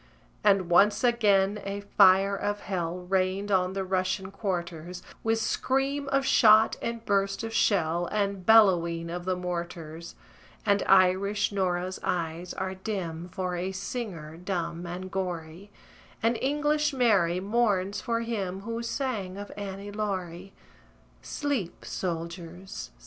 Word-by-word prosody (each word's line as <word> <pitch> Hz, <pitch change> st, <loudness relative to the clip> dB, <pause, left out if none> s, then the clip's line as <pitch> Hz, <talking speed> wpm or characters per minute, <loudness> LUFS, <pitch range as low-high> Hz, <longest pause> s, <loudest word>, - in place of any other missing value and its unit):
And 195 Hz, -3 st, +4 dB
once 200 Hz, +7 st, +4 dB
again 210 Hz, -4 st, +3 dB
a 200 Hz, +1 st, -4 dB
fire 195 Hz, 0 st, +5 dB
of 205 Hz, +1 st, -2 dB
hell 180 Hz, -2 st, -3 dB
Rained 190 Hz, +2 st, 0 dB
on 185 Hz, -1 st, +2 dB
the 195 Hz, 0 st, -2 dB
Russian 190 Hz, 0 st, -1 dB
quarters, 180 Hz, -3 st, -4 dB, 0.2 s
With 225 Hz, 0 st, +2 dB
scream 270 Hz, +5 st, 0 dB
of 275 Hz, -1 st, +1 dB
shot, 220 Hz, -4 st, +6 dB
and 230 Hz, -1 st, -4 dB
burst 195 Hz, +1 st, 0 dB
of 225 Hz, 0 st, -4 dB
shell, 175 Hz, -5 st, +2 dB
And 200 Hz, -2 st, -1 dB
bellowing 170 Hz, -6 st, +4 dB
of 175 Hz, 0 st, -5 dB
the 185 Hz, 0 st, 0 dB
mortars! 170 Hz, -2 st, -5 dB, 0.5 s
And 200 Hz, 0 st, +3 dB
Irish 195 Hz, +3 st, +4 dB
Nora's 185 Hz, -2 st, -1 dB
eyes 170 Hz, 0 st, -2 dB
are 190 Hz, 0 st, -3 dB
dim 185 Hz, -4 st, -5 dB
For 185 Hz, 0 st, -3 dB
a 180 Hz, +2 st, -2 dB
singer, 190 Hz, -6 st, -5 dB
dumb 175 Hz, -1 st, -3 dB
and 185 Hz, +2 st, -6 dB
gory; 180 Hz, 0 st, -4 dB, 0.5 s
And 230 Hz, +1 st, +3 dB
English 295 Hz, +2 st, +1 dB
Mary 200 Hz, -9 st, +3 dB
mourns 200 Hz, -2 st, 0 dB
for 230 Hz, -2 st, -1 dB
him 195 Hz, -5 st, -3 dB
Who 230 Hz, +2 st, -4 dB
sang 230 Hz, -6 st, -3 dB
of 205 Hz, 0 st, -7 dB
"Annie 200 Hz, 0 st, -6 dB
Laurie." 190 Hz, -3 st, -4 dB, 0.7 s
Sleep, 275 Hz, -, -3 dB
soldiers! 170 Hz, +2 st, -5 dB
190 Hz, 130 wpm, -28 LUFS, 180-210 Hz, 0.7 s, shot